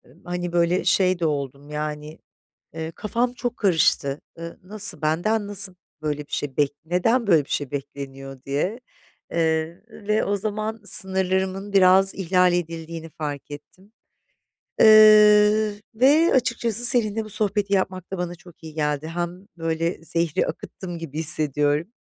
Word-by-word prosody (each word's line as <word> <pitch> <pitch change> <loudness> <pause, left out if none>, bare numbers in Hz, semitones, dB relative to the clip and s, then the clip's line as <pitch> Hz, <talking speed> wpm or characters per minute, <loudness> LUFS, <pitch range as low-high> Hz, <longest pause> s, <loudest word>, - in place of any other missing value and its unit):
ımm, 175 - -25
hani, 175 0 -4
böyle, 175 +1 +2
şey 185 -2 +2
de 170 - 0
oldum, 140 -1 -3
yani, 150 +1 -5 0.5
eee, 160 0 -5
kafam 235 +3 -1
çok 245 -1 -4
karıştı. 155 -7 +2 0.2
Iıı, 170 0 -9
nasıl 200 -4 -3
benden 200 +8 0
nasıl 200 -2 -2 0.3
böyle 150 -1 -2
bir - - -27
şey 140 -3 -3
bek 145 -1 +2
neden 220 +8 +1
böyle 160 -7 +4
bir - - -24
şey 145 -2 -2
bekleniyor 135 -1 -7
diye. 150 - -2 0.5
Eee, 160 0 -1
ve 215 0 -1
o 205 - 0
zaman 215 +2 -4
sınırlarımın 190 +1 0
biraz 190 0 +5
ihlal 180 -1 +2
edildiğini 165 -1 -4
farkettim. 150 +6 -8 0.9
Eee, 215 0 +7 0.2
ve 290 +8 +4
açıkçası 235 -2 0
seninle 225 -3 +2
bu - - -10
sohbeti 205 -1 -1
yapmak 185 -1 -2
da 190 - -3
bana 175 0 -4
çok 175 0 -18
iyi 160 -1 -9
geldi. 150 -1 -2
Hem, 175 +3 -5
böyle, 165 +1 -2
zehri 165 -1 -1
akıttım 175 -3 -7
gibi 160 -2 -6
hissediyorum, 150 0 +2
175 Hz, 140 wpm, -23 LUFS, 155-205 Hz, 0.9 s, Eee